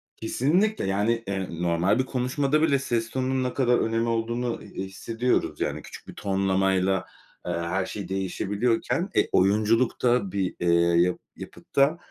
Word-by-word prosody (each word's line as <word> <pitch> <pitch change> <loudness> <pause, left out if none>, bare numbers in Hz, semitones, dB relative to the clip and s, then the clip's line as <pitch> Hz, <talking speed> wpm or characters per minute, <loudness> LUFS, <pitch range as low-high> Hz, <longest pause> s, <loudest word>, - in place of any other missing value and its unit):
Kesinlikle, 175 - +1
yani, 105 +4 0
eee, 95 -1 -2
normal 85 +5 +2
bir 130 - +1
konuşmada 135 +3 0
bile 140 -4 +3
ses 115 -4 -1
tonunun 130 +1 -1
ne 125 - -2
kadar 125 -3 +3
önemi 115 +1 0
olduğunu, 115 +1 -2
e - - -12
eee, - - -6
hissediyoruz. 115 +6 -1
Yani, - - -2
küçük - - -12
bir - - -9
tonlamayla, 95 -1 +1 0.4
eee, 90 - -2
her 85 +3 -1
şey 100 -3 -6
değişebiliyorken, 105 - -1
e, - - +3
oyunculukta, 110 +2 +2
bir, 95 -2 -2
eee, 85 - -1 0.3
ya 90 +1 +3 0.2
yapıtta, 140 +4 0
115 Hz, 150 wpm, -26 LUFS, 95-125 Hz, 0.4 s, bile